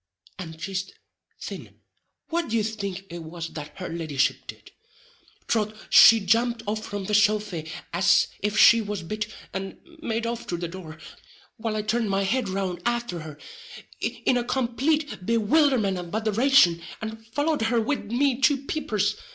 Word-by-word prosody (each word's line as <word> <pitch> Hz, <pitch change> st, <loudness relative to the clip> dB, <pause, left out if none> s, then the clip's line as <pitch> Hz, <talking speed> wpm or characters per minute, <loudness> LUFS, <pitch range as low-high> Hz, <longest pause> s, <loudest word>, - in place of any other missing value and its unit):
—and 160 Hz, -3 st, -7 dB
jist 185 Hz, +2 st, -4 dB, 0.5 s
thin -, -, -8 dB, 0.5 s
what 335 Hz, -3 st, -1 dB
d'ye 225 Hz, -1 st, +1 dB
think 200 Hz, -3 st, -4 dB
it 170 Hz, -, -6 dB
was 165 Hz, +1 st, -6 dB
that 150 Hz, -2 st, -9 dB
her 185 Hz, -, -5 dB
leddyship 155 Hz, -5 st, -1 dB
did? -, -, -11 dB, 0.8 s
Troth 215 Hz, -1 st, 0 dB, 0.2 s
she 230 Hz, -, +9 dB
jumped 230 Hz, +3 st, +1 dB
up 215 Hz, +1 st, -1 dB
from 205 Hz, -2 st, -5 dB
the 210 Hz, -, -4 dB
sofy 205 Hz, -6 st, +2 dB, 0.2 s
as 190 Hz, +3 st, +4 dB
if 210 Hz, +1 st, -1 dB
she 230 Hz, 0 st, +7 dB
was 205 Hz, -4 st, -4 dB
bit, 215 Hz, +5 st, -3 dB, 0.3 s
and 190 Hz, 0 st, -5 dB, 0.2 s
made 230 Hz, -4 st, -2 dB
off 235 Hz, 0 st, -4 dB
through 175 Hz, -, -2 dB
the 175 Hz, 0 st, -3 dB
door, 165 Hz, -2 st, -9 dB, 0.6 s
while 220 Hz, -1 st, -3 dB
I 215 Hz, -, -1 dB
turned 220 Hz, 0 st, 0 dB
my 195 Hz, 0 st, +1 dB
head 220 Hz, +2 st, 0 dB
round 185 Hz, -2 st, -3 dB
afther 235 Hz, -6 st, -1 dB
her, 155 Hz, -2 st, -9 dB, 0.6 s
in 250 Hz, -, 0 dB
a 245 Hz, -, 0 dB
complate 265 Hz, +2 st, -1 dB
bewilderment 230 Hz, -, +2 dB
and 175 Hz, -1 st, -8 dB
botheration, 220 Hz, -4 st, +4 dB, 0.2 s
and 220 Hz, 0 st, -6 dB
followed 290 Hz, +5 st, 0 dB
her 225 Hz, +1 st, +2 dB
wid 225 Hz, -2 st, -2 dB
me 265 Hz, +1 st, +1 dB
two 275 Hz, +1 st, +3 dB
peepers. 210 Hz, -9 st, -1 dB
215 Hz, 160 wpm, -25 LUFS, 185-235 Hz, 0.8 s, she